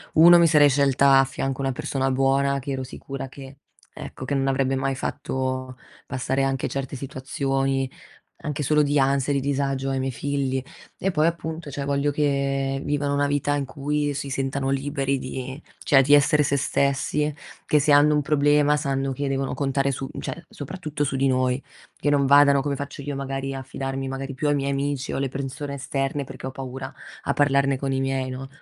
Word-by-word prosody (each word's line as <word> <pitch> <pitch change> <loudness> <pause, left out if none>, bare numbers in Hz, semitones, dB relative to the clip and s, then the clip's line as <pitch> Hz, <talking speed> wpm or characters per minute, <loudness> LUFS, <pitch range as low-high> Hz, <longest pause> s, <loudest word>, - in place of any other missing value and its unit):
1 170 +2 +9
mi 170 -1 +6
sarei 150 -2 +6
scelta 140 0 +4
a - - +6
fianco 135 0 -3
una 135 0 0
persona 135 +1 -1
buona 135 +1 +2
che 140 +1 -5
ero 130 -1 -2
sicura 135 +1 -7
che, 135 0 -11 0.4
ecco, 130 - -8
che 140 - -1
non 135 0 +1
avrebbe 135 0 +1
mai 135 0 -1
fatto 130 -1 -3 0.3
passare 135 +1 -1
anche 135 0 0
certe 135 -1 -4
situazioni, 135 0 -1 0.5
anche 150 0 -3
solo 150 +2 +3
di 145 0 +1
ansia 135 +1 +2
e - - 0
di 135 - +1
disagio 135 -1 -1
ai 135 0 -1
miei 130 0 -1
figli. 135 -2 -1 0.3
E 195 - 0
poi 155 0 +2
appunto, 160 -2 -4
cioè, 140 0 -4
voglio 140 +1 0
che 140 -1 0
vivano 145 0 0
una 145 0 +2
vita 145 0 0
in 140 -1 -1
cui 145 +2 -2
si 140 0 -4
sentano 135 0 -2
liberi 135 0 -1
di, 130 +3 -6 0.2
cioè, 135 -2 +6
di 145 +2 +3
essere 150 +1 +5
se 140 - +1
stessi, 140 +2 0 0.3
che 150 - +3
se 150 - +2
hanno 145 +1 +6
un 150 - +2
problema 145 0 +3
sanno 135 -2 -1
che 140 +2 -3
devono 135 0 -1
contare 135 0 0
su, 135 0 -5
cioè, 170 +2 -6
soprattutto 150 0 -5
su 135 -1 -1
di 135 +1 +2
noi, 130 0 +1 0.4
che 145 - 0
non 140 -1 +3
vadano, 140 0 +6
come 140 -1 -2
faccio 140 0 -6
io 145 0 -4
magari, 135 0 -3
a 135 - -5
fidarmi 135 +1 -4
magari 135 +1 -4
più 145 +3 -2
dei 145 - +3
miei 140 0 -1
amici 140 -1 -2
o - - -2
le 135 - 0
persone 140 +2 -5
esterne 135 +1 -2
perché 130 0 -9
ho 130 - -5
paura 130 0 -7 0.3
a 140 - 0
parlarne 140 -1 +2
con 135 0 -2
i 135 - 0
miei, 135 -1 -1
no? 130 +1 -6
135 Hz, 200 wpm, -24 LUFS, 135-145 Hz, 0.5 s, 1